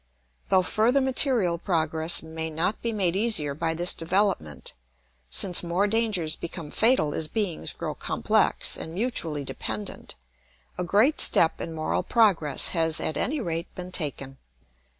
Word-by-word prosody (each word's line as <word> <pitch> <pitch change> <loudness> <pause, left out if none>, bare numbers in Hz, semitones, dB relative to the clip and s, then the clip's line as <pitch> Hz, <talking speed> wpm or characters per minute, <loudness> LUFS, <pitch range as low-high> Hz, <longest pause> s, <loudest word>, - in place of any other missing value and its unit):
Though 190 -1 +3
further 225 +8 +2
material 250 - +2
progress 160 -2 0
may 160 0 -5
not 165 +6 -2
be 235 - -1
made 190 -5 0
easier 195 -9 +1
by 165 +2 -2
this 175 +2 +2
development, 175 - -2 0.6
since 175 - +3
more 175 +3 0
dangers 205 -7 0
become 165 -3 -8
fatal 220 - +2
as 160 - 0
beings 195 -2 -1
grow - - -4
complex - - 0
and 160 - -8
mutually 170 - 0
dependent, 110 -5 -6 0.6
a 180 - -4
great 215 - +3
step 165 - +5
in 165 - -6
moral 155 0 -2
progress 190 - +2
has 160 -2 0
at 155 - -2
any 295 +3 -2
rate 170 -5 -4
been 180 0 -8
taken. 140 -5 -4
170 Hz, 145 wpm, -25 LUFS, 160-210 Hz, 0.6 s, step